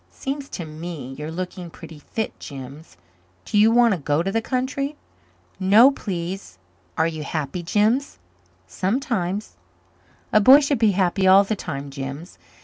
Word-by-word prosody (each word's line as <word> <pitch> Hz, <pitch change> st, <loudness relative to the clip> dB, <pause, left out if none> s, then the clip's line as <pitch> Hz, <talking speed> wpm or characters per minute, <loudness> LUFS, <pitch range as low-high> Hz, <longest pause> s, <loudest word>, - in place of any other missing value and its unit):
"It -, -, -31 dB
seems 275 Hz, 0 st, -5 dB
to 175 Hz, -, -6 dB
me 155 Hz, -4 st, -7 dB
you're 150 Hz, +1 st, -5 dB
looking 180 Hz, +1 st, -6 dB
pretty 160 Hz, -1 st, -12 dB
fit, 220 Hz, +9 st, -5 dB
Jims. 135 Hz, -, -10 dB, 0.5 s
Do -, -, -5 dB
you 210 Hz, +2 st, +6 dB
want 235 Hz, -1 st, +4 dB
to 185 Hz, -, -3 dB
go 145 Hz, +2 st, 0 dB
to 195 Hz, -, -2 dB
the 225 Hz, -, 0 dB
country?" 275 Hz, +4 st, -2 dB, 0.6 s
"No, 210 Hz, +8 st, +6 dB
please." 180 Hz, -, -5 dB, 0.4 s
"Are 160 Hz, -, +3 dB
you 160 Hz, -2 st, -3 dB
happy, 150 Hz, +2 st, -3 dB
Jims?" 215 Hz, +10 st, +1 dB, 0.5 s
"Sometimes." 200 Hz, -, -2 dB, 0.8 s
"A 215 Hz, -, +6 dB
boy 265 Hz, +7 st, +9 dB
should 280 Hz, -3 st, 0 dB
be 220 Hz, -3 st, +4 dB
happy 190 Hz, 0 st, +1 dB
all 190 Hz, +1 st, +7 dB
the 215 Hz, +2 st, -2 dB
time, 140 Hz, -6 st, -6 dB
Jims." 140 Hz, +5 st, -7 dB
185 Hz, 155 wpm, -23 LUFS, 160-225 Hz, 0.8 s, boy